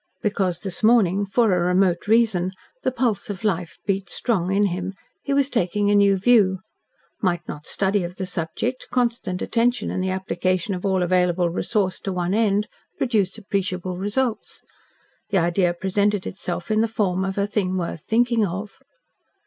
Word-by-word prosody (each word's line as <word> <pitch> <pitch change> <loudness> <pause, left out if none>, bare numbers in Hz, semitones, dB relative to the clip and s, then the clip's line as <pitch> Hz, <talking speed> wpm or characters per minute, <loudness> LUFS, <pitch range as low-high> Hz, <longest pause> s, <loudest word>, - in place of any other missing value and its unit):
Because 190 -4 0
this 190 -3 -3
morning, 205 -4 +4
for 220 0 +3
a 180 - +2
remote 180 0 +2
reason, 210 -5 +2 0.3
the - - +1
pulse 230 -6 -1
of 205 +1 -5
life 175 -7 -1
beat 195 -2 -1
strong 190 -7 -1
in 200 +1 +3
him 185 +2 -4 0.3
he 280 - -4
was 280 -1 +3
taking 205 -4 +1
a - - +4
new 200 -1 +5
view. 200 -2 +4 0.6
Might 180 -3 0
not 150 +1 -7
study 195 0 +1
of 175 +1 -6
the 190 - -4
subject, 180 +8 -3
constant 235 -7 -1
attention 240 +1 +1
and 185 - -2
the 190 - -1
application 185 0 -1
of 185 +2 -3
all 190 -2 +2
available 180 -1 +2
resource 190 +1 -1
to 195 - -4
one 180 0 -1
end 210 -1 +2 0.3
produce 215 -7 0
appreciable 185 -3 -2
results? 215 +6 -2 0.7
The 200 - +1
idea 175 +1 +2
presented 195 +2 0
itself 180 0 -4
in 215 0 +3
the 225 - +2
form 195 -5 0
of 190 0 -3
a 200 - +2
thing 195 -3 -1
worth 170 -3 -3
thinking 230 +3 +2
of. 200 +2 -4
195 Hz, 170 wpm, -23 LUFS, 180-215 Hz, 0.7 s, new